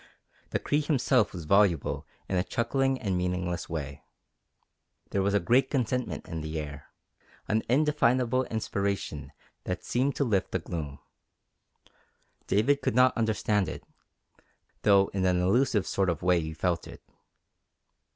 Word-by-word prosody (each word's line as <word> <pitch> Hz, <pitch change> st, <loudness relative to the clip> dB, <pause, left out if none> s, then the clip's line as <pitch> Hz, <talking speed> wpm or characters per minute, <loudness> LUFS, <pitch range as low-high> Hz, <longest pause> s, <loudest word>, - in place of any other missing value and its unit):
The -, -, 0 dB
Cree 145 Hz, +1 st, 0 dB
himself 130 Hz, -6 st, +2 dB
was 85 Hz, -4 st, -7 dB
voluble 100 Hz, -4 st, +2 dB, 0.2 s
in 95 Hz, -, -2 dB
a 90 Hz, -, +2 dB
chuckling 135 Hz, +4 st, 0 dB
and 100 Hz, -5 st, -1 dB
meaningless 90 Hz, -1 st, -2 dB
way. 75 Hz, -4 st, -5 dB, 1.1 s
There 100 Hz, -, +1 dB
was 100 Hz, +1 st, +1 dB
a -, -, +4 dB
great 125 Hz, +8 st, +3 dB
contentment 125 Hz, -2 st, -2 dB
in 80 Hz, -1 st, -5 dB
the 80 Hz, +1 st, -4 dB
air, 75 Hz, -2 st, -7 dB, 0.6 s
an 110 Hz, +1 st, +1 dB
indefinable 130 Hz, -3 st, +2 dB
inspiration 100 Hz, -, -3 dB, 0.3 s
that -, -, -3 dB
seemed 130 Hz, +3 st, 0 dB
to -, -, +1 dB
lift 100 Hz, -7 st, 0 dB
the -, -, +2 dB
gloom. 80 Hz, -5 st, -5 dB, 1.5 s
David 135 Hz, +8 st, +2 dB
could -, -, -1 dB
not 130 Hz, 0 st, +5 dB
understand 110 Hz, -3 st, +1 dB
it, -, -, -7 dB, 1.0 s
though 100 Hz, -2 st, +4 dB
in 95 Hz, -1 st, -1 dB
an 90 Hz, -1 st, +2 dB
elusive 105 Hz, +3 st, +2 dB
sort 95 Hz, -2 st, 0 dB
of 85 Hz, -1 st, -2 dB
way 90 Hz, -1 st, +4 dB
he 80 Hz, 0 st, -5 dB
felt 85 Hz, +1 st, -1 dB
it. -, -, -12 dB
100 Hz, 140 wpm, -28 LUFS, 90-125 Hz, 1.5 s, not